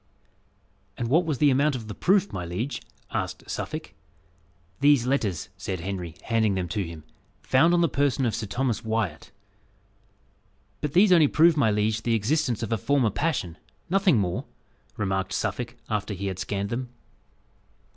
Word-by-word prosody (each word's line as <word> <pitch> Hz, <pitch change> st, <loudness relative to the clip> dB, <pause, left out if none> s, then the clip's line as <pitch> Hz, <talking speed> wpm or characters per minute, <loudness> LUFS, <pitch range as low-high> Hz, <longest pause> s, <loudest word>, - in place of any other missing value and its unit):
"And 115 Hz, -, -2 dB
what 165 Hz, +6 st, +4 dB
was 150 Hz, -4 st, 0 dB
the 145 Hz, 0 st, +4 dB
amount 140 Hz, +2 st, +2 dB
of 115 Hz, -4 st, -6 dB
the 105 Hz, -, -5 dB
proof, 195 Hz, -, +2 dB
my 90 Hz, -, -3 dB
liege?" 100 Hz, +11 st, -3 dB, 0.3 s
asked -, -, -3 dB
Suffolk. -, -, -5 dB, 0.9 s
"These 145 Hz, -4 st, +5 dB
letters," 115 Hz, -, -1 dB
said 95 Hz, -3 st, -4 dB
Henry, 90 Hz, -3 st, -5 dB
handing 110 Hz, -3 st, +1 dB
them 90 Hz, -2 st, -2 dB
to 105 Hz, -3 st, -1 dB
him, 80 Hz, -3 st, -8 dB, 0.4 s
"found 135 Hz, +6 st, +4 dB
on 175 Hz, -, +3 dB
the 170 Hz, -, +4 dB
person 140 Hz, -3 st, +1 dB
of 115 Hz, -, 0 dB
Sir 110 Hz, -, -3 dB
Thomas 125 Hz, +1 st, -1 dB
Wyat." 110 Hz, 0 st, -2 dB, 1.5 s
"But 150 Hz, -1 st, -2 dB
these 190 Hz, +2 st, +5 dB
only 165 Hz, -4 st, +7 dB
prove, 165 Hz, +3 st, +5 dB
my 140 Hz, -7 st, +3 dB
liege, 105 Hz, +1 st, +1 dB
the 115 Hz, 0 st, +1 dB
existence 120 Hz, +1 st, 0 dB
of 115 Hz, -, -4 dB
a 115 Hz, -, +1 dB
former 130 Hz, -2 st, +2 dB
passion 95 Hz, -, -2 dB, 0.3 s
nothing 195 Hz, -, +4 dB
more," 90 Hz, -4 st, -1 dB, 0.5 s
remarked 95 Hz, -2 st, -1 dB
Suffolk, -, -, -2 dB
after 105 Hz, -1 st, -2 dB
he 100 Hz, +2 st, -5 dB
had 95 Hz, -2 st, -3 dB
scanned 100 Hz, +1 st, -2 dB
them. 125 Hz, +2 st, -3 dB
115 Hz, 165 wpm, -26 LUFS, 100-145 Hz, 1.5 s, only